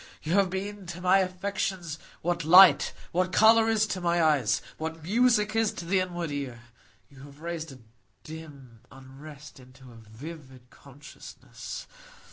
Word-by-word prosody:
You 160 - -2
have 195 -1 +3
been 195 +1 -6
to 175 0 -7
my 185 +2 +4
affections 185 -3 -3 0.2
what 170 0 -1
light, 180 0 +7 0.2
what 185 +1 0
colour 225 +3 +5
is 220 -1 +2
to 190 -3 -4
my 175 0 +1
eyes, 140 -9 +2 0.2
what 160 0 -6
music 215 +2 +2
is 225 -2 +2
to 170 - -8
the 190 +3 +1
inward 175 -3 -4
ear, 130 -5 -6 0.4
you 140 - -18
have 140 +1 -14
raised 165 -2 -5
a 135 - -12 0.5
dim 145 -7 -12
unrest 135 +2 -13
into 130 0 -16
a - - -15
vivid 130 0 -12
consciousness. 140 +1 -11
165 Hz, 150 wpm, -27 LUFS, 140-190 Hz, 0.5 s, light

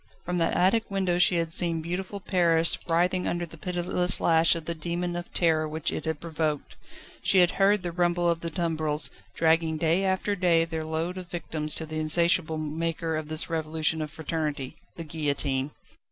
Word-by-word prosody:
From 180 0 -1
that 165 - +1
attic 195 +6 +2
window 190 -3 0
she 180 0 +4
had 165 -1 -1
seen 170 -2 +1
beautiful 185 +5 -4
Paris 170 -4 +4
writhing 180 +2 +1
under 175 0 -2
the 165 - -13
pitiless 180 +1 0
lash 165 0 +4
of 165 -2 -6
the 170 - -3
demon 175 +2 -3
of 175 0 -6
terror 160 -2 +2
which 160 +1 -2
it - - -4
had 160 -2 -2
provoked; 155 -3 -3 0.5
she 195 - +2
had 180 -1 +5
heard 200 0 +2
the 175 - -3
rumble 175 0 +1
of 170 -1 +1
the 170 - -4
tumbrils, 160 -3 -1 0.2
dragging 160 -1 +2
day 165 +4 +1
after 190 +2 0
day 170 -3 +3
their 160 -1 -4
load 165 +4 -3
of 180 -1 -10
victims 155 -3 -3
to 160 - -1
the 155 0 -5
insatiable 160 +1 +2
maker 160 +1 -2
of 155 -1 -4
this 155 0 -1
Revolution 160 -1 -1
of 155 - -4
Fraternity 150 -3 -4 0.2
the 165 - -6
Guillotine. 145 -3 +1
165 Hz, 185 wpm, -27 LUFS, 155-175 Hz, 0.5 s, had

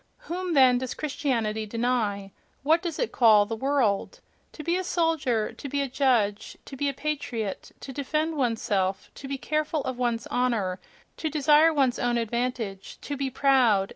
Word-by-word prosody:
Whom, 360 -6 -3
then, 255 -2 +6
does 255 -1 -4
Christianity 230 -8 -2
deny? 215 -4 -1 0.3
what 320 +4 +3
does 345 -4 -4
it - - -1
call 215 -4 +5
"the 225 +2 -4
world"? 265 - 0 0.3
To 305 - -8
be 340 +3 0
a 370 - -1
soldier, 320 -11 0
to 280 - -8
be 285 - -1
a 280 - 0
judge, 245 -6 0
to 275 - -9
be 285 +1 0
a - - -3
patriot; 265 -9 -4
to 270 - -8
defend 305 +4 -1
one's 240 -6 0
self; 190 -1 -1
to 275 - -9
be 275 0 -3
careful 305 +1 -1
of 255 -1 -4
one's 235 -2 -1
honour; 220 -7 -1 0.4
to 315 - -2
desire 300 +2 +5
one's 270 -5 +1
own 240 0 +1
advantage; 230 -3 -3
to 290 - -4
be 275 -1 -2
proud 250 -7 +3
260 Hz, 175 wpm, -26 LUFS, 225-295 Hz, 0.4 s, then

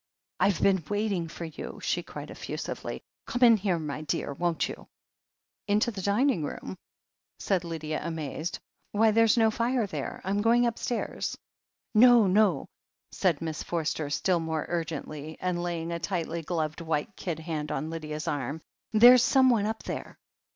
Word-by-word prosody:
"Fve 200 -3 +2
been 190 -3 +3
waiting 205 -5 0
for 170 +1 -7
you!" 160 - -7
she - - -1
cried - - -9
effusively. - - -5 0.2
"Come 250 -1 0
in 235 -2 +8
here, 190 -3 0
my 150 -2 -4
dear, 140 -1 -2
won't 170 +2 0
you - - -9 0.4
?" - - -64
"Into 210 +3 +2
the 200 -3 -6
dining 205 - +2
room 95 -9 -5 0.3
?" - - -65
said 185 -3 0
Lydia, 155 -2 -4
amazed. 160 +1 -4 0.4
"Why, 220 +1 +4
there's 225 +1 +4
no 225 -1 +4
fire 235 +1 +1
there! 190 - -5
I'm 200 +2 0
going 235 +2 +4
upstairs." 235 0 -2 0.6
"No, 240 0 +7
no," 190 -4 +3 0.5
said 170 -5 +1
Miss 160 -2 -3
Forster 160 -3 -2
still 175 +4 +1
more 160 -2 -2
urgently, 155 -2 -4
and 180 -1 -1
laying 170 -1 -3
a 170 - -2
tightly 170 -1 -2
gloved 160 -1 -2
white 160 +4 -2
kid 170 -4 -4
hand 155 -2 -4
on 155 +1 -3
Lydia's 155 -1 -5
arm. 145 +1 -2 0.3
"There's 240 +3 +9
someone 250 -5 +4
up 220 0 -4
there." - - -6
175 Hz, 160 wpm, -28 LUFS, 160-215 Hz, 0.6 s, There's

